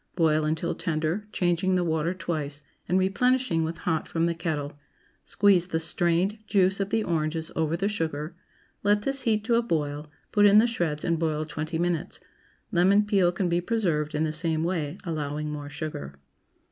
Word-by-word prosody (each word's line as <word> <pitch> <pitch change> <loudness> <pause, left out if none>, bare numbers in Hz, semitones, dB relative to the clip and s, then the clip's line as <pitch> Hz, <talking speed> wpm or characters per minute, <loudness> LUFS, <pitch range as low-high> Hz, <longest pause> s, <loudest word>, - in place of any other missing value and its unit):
Boil 155 -3 +2
until 160 +2 -1
tender, 165 +6 -2
changing 180 0 +1
the 180 - +2
water 160 0 0
twice, 155 -5 -4 0.3
and 180 - +3
replenishing 200 -1 +2
with 165 +1 -3
hot 165 -1 -1
from 165 0 0
the 170 - +1
kettle. 150 -4 -4 0.4
Squeeze 195 -4 +3
the 160 -3 -1
strained 175 +5 +1
juice 190 -1 +3
of 195 0 -1
the 225 0 +1
oranges 160 -2 -1
over 160 +1 0
the 195 +3 0
sugar; 160 -5 -3 0.5
let 205 0 +2
this 275 +2 0
heat 220 -4 +1
to 235 - 0
a 230 - +4
boil; 150 -8 -2 0.2
put 205 0 +5
in 205 +1 +6
the 220 - +7
shreds 170 -10 -1
and 170 -2 +1
boil 155 -1 0
twenty 155 +2 -4
minutes. 170 -1 -1 0.5
Lemon 195 +3 +4
peel 195 -4 +3
can 180 +1 -1
be 175 0 +1
preserved 175 -9 -1
in 155 - +1
the 155 -1 -1
same 160 0 -1
way, 165 -4 -2
allowing 150 -2 -3
more 145 -1 -6
sugar. 105 - -6
170 Hz, 180 wpm, -26 LUFS, 155-195 Hz, 0.5 s, the